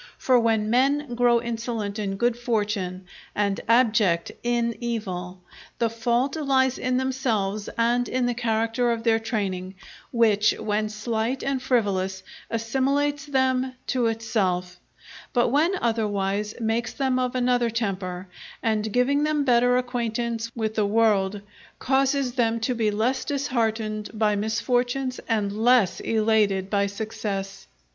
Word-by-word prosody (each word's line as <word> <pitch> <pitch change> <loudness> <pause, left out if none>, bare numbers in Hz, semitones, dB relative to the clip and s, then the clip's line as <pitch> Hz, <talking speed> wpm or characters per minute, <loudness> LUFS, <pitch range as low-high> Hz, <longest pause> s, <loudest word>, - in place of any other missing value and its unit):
For 255 -2 +3
when 220 -2 +1
men 270 +2 +2
grow 240 0 +3
insolent 230 -3 -4
in 195 -2 -2
good 240 +3 +1
fortune, 210 -6 -2 0.3
and 200 -1 0
abject 220 -7 +3
inn 235 -1 0
evil, 185 -6 -4 0.3
the 230 -1 0
fault 240 +4 0
lies 265 -4 +1
in 255 0 0
themselves 225 -6 -1
and 240 +1 +2
in 255 -1 0
the 245 - +1
character 230 +1 0
of 230 -1 -1
their 225 -1 +3
training, 195 -4 -3 0.3
which, 215 -3 +3
when 215 0 -1
slight 225 +4 -2
and 270 -1 -1
frivolous, 195 -7 0 0.3
assimilates 275 +6 0
them 260 -2 +1
to 250 -3 +1
itself; 190 -6 -1 0.5
but 240 -2 +3
when 305 +8 +2
otherwise, 210 -2 -1
makes 225 +1 -1
them 265 -2 0
of 250 0 -1
another 245 -1 +2
temper, 195 -5 -3 0.4
and 220 -1 0
giving 255 +5 +2
them 300 -1 +1
better 245 -1 +4
acquaintance 235 -2 -2
with 220 -2 -2
the 215 -2 +1
world, 205 -2 +2 0.4
causes 270 -1 +1
them 230 -2 +1
to 250 +3 0
be 225 -3 +1
less 225 +6 0
disheartened 225 -7 -1
by 210 -1 +2
misfortunes 245 +4 -1
and 210 -3 +1
less 220 -2 +3
elated 215 -4 +1
by 200 -1 +2
success. 200 -2 -5
230 Hz, 135 wpm, -25 LUFS, 210-250 Hz, 0.5 s, better